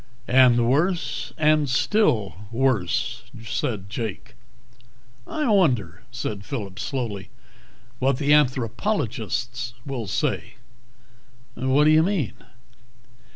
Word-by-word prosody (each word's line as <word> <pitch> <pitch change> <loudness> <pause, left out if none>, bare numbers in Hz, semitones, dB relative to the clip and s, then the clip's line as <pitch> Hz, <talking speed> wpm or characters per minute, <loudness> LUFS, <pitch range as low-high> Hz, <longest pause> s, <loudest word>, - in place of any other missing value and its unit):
"And 125 -2 +5
worse. 135 -4 0
And 155 -2 +3
still 130 - +2 0.2
worse," 120 -7 0 0.2
said 110 -3 -2
Jake. 110 0 -5 0.9
"I 305 -2 -2
wonder," 125 - +2
said 110 -4 -5
Phillip 105 -8 -6
slowly, 115 -8 -4 0.7
"what 130 0 +2
the 145 +1 +3
anthropologists 120 - 0
will 130 -6 -4
say." - - -2 1.0
"What 130 +3 +2
do 155 - +5
you 155 0 +6
mean?" 175 - 0
125 Hz, 95 wpm, -24 LUFS, 115-150 Hz, 1.0 s, you